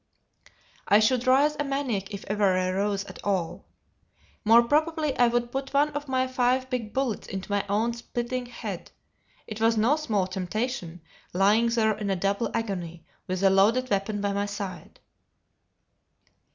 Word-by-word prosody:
I 205 - +6
should 245 +3 +2
rise 285 +4 +4
a - - +1
maniac 270 -9 -2
if 200 -1 -7
ever 200 -2 +2
I 185 0 0
rose 200 +1 -1
at - - -11
all. 190 -5 -2 0.8
More 230 +2 +6
probably 305 +2 +1
I 245 - +4
would 240 0 0
put 270 +1 -4
one 290 +2 +4
of 290 0 -5
my 260 -1 +1
five 255 0 0
big 230 -4 -3
bullets 260 -3 -2
into 195 +1 -6
my 200 0 +1
own 220 +4 +1
splitting 240 +1 -4
head; 240 - -7 0.6
it 215 0 -7
was 225 0 +3
no 240 +8 +3
small 215 -11 0
temptation, 185 -1 -4 0.3
lying 205 +5 +4
there 220 -2 +2
in 205 -2 -4
a 195 - +1
double 200 +4 0
agony, 175 -7 -4 0.2
with 185 0 -2
the 195 -1 +5
loaded 225 +7 +3
weapon 200 +1 0
by 200 0 0
my 200 +1 -1
side. 195 -5 -7
220 Hz, 165 wpm, -26 LUFS, 195-255 Hz, 0.8 s, I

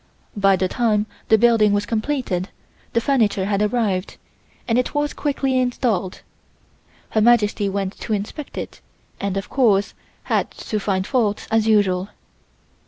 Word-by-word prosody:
By 195 -1 +4
the 185 0 0
time 215 -1 +1 0.2
the 220 - +6
building 220 -2 +4
was 205 0 +1
completed 220 -5 -2 0.4
the 230 - +3
furniture 220 -7 +1
had 200 0 0
arrived, 210 -4 -1 0.5
and 235 0 +2
it 250 - -2
was 290 0 0
quickly 270 -3 0
installed. 235 -7 -1 0.9
Her 220 - +2
Majesty 210 -3 +3
went 195 0 -3
to 220 - -3
inspect 215 +8 -5
it - - -6 0.4
and, 200 -1 -2
of 195 - -5
course, 210 -7 +2 0.3
had - - 0
to 215 - -4
find 190 -2 -1
fault 215 -4 0
as 225 0 +2
usual. 200 -3 +2
210 Hz, 145 wpm, -21 LUFS, 195-240 Hz, 0.9 s, the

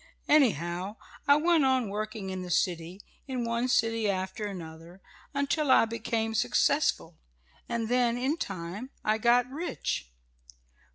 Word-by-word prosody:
Anyhow 190 - +2 0.3
I 285 - +7
kept 310 - -4 0.2
on 260 -3 +2
working 210 -1 -4
in 185 0 -4
the 180 - -7
city 175 +2 -1 0.2
in 255 -3 -2
one 235 +2 0
city 225 -3 +2
after 190 +2 -2
another 170 -1 -9 0.3
until 285 +1 0
I 260 - +6
became 225 0 -2
successful 125 - +1 0.5
and 230 -1 -1
then, 245 0 +2
in 265 +6 0
time, 195 - -5 0.2
I 215 +1 +2
got 240 +2 +4
rich." 275 - -3
220 Hz, 130 wpm, -29 LUFS, 185-245 Hz, 0.5 s, I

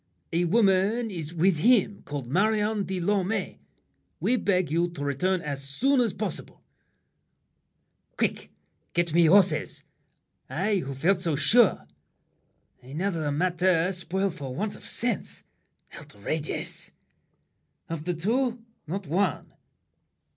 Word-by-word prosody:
"A 175 +1 +2
woman 210 +3 +2
is 165 -4 -5
With 175 +1 +2
him, 205 +1 +3
called 145 -3 -5
Marion 210 - +1
de 190 -1 -3
Lorme. 200 +3 -1 0.6
We 250 - +2
beg 185 - +1
You 170 +2 +1
to 155 -4 -7
return 180 +7 0
as 140 -2 -4
soon 250 - +2
as 230 -4 +2
possible." 195 -4 -5 1.5
Quick! - - -1 0.4
Get 170 -2 0
me 170 0 +5
horses! 185 -2 +3 0.7
I, 200 +5 0
who 140 -6 -4
felt 175 +7 +2
so 165 -4 0
sure! 210 - +4 1.0
Another 155 +3 -2
matter 180 +2 +2
spoiled 190 +1 -2
for 135 -7 -6
want 205 +2 -2
of - - -11
sense. 235 -3 -1 0.5
Outrageous! 145 +10 -4 0.9
Of 165 -2 -5
the 180 -1 -1
two, 235 +6 0 0.2
not 190 +4 -4
one! 175 +2 -1
180 Hz, 120 wpm, -27 LUFS, 160-205 Hz, 1.5 s, me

